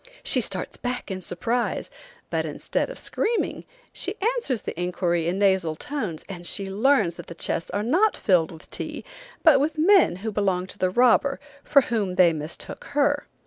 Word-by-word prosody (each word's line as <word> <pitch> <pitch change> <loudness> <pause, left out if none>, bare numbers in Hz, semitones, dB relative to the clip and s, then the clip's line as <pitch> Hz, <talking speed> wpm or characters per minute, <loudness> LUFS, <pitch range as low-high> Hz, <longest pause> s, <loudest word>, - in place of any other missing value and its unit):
She - - +3
starts - - -2
back 245 -4 -4
in 185 0 -4
surprise, 230 +8 -2 0.4
but - - 0
instead - - -2
of - - -8
screaming, 460 +1 -1 0.3
she 385 +3 0 0.2
answers 260 - -1
the - - -4
inquiry 175 -2 0
in 180 +2 -1
nasal 190 -5 +2
tones, 220 - -4
and 180 -3 -8
she 195 +2 0
learns 210 -5 +2
that - - -9
the 170 - -9
chests 165 - -1
are 205 - -2
not 360 - +2
filled 175 -5 +2
with 160 -2 -13
tea, - - -5 0.4
but 315 -5 +7
with 300 +3 -1
men 360 - +5
who 220 - -1
belong 195 -3 0
to 185 +1 -11
the 185 - +2
robber, 250 +6 +3 0.2
for 280 - +5
whom 205 -7 -1
they 175 -2 +5
mistook 155 +1 -5
her. 290 0 +2
205 Hz, 180 wpm, -24 LUFS, 180-280 Hz, 0.4 s, but